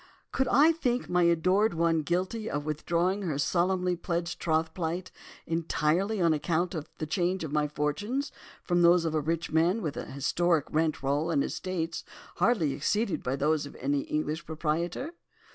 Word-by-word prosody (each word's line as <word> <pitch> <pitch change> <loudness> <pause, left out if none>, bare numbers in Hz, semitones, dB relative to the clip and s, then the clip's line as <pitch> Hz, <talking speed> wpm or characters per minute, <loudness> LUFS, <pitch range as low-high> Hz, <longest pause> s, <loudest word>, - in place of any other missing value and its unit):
Could 265 - +1
I 305 +4 +6
think 255 -7 -1
my 180 0 +2
adored 185 +5 +3
one 165 -1 +2
guilty 185 +8 -2
of 145 0 -3
withdrawing 170 +5 0
from 190 -4 -3
her 145 - -1
solemnly 180 +4 +1
pledged 170 0 -3
troth 160 -1 0
plight, 175 +1 -3 0.3
entirely 165 +5 0
on 170 -3 +4
account 170 +3 0
of 155 -3 -5
the 155 - -3
change 180 +3 0
in 150 -2 -5
my 150 -1 +2
fortunes 205 - -2 0.3
from 175 -1 +1
those 170 0 +5
of 160 - -1
a 155 - +1
rich 165 +2 -2
man 170 +7 +3
with 150 -3 -3
an - - -5
historic 160 +3 +1
rent 155 -2 0
roll 145 +4 0
and 145 -4 +2
estates 165 -3 -3 0.3
hardly 180 - +2
exceeded 205 +6 0
by 125 +1 -1
those 150 +1 +1
of - - -12
any 140 +2 0
English 155 +3 -3
proprietor? 170 - -2
170 Hz, 175 wpm, -29 LUFS, 155-185 Hz, 0.3 s, I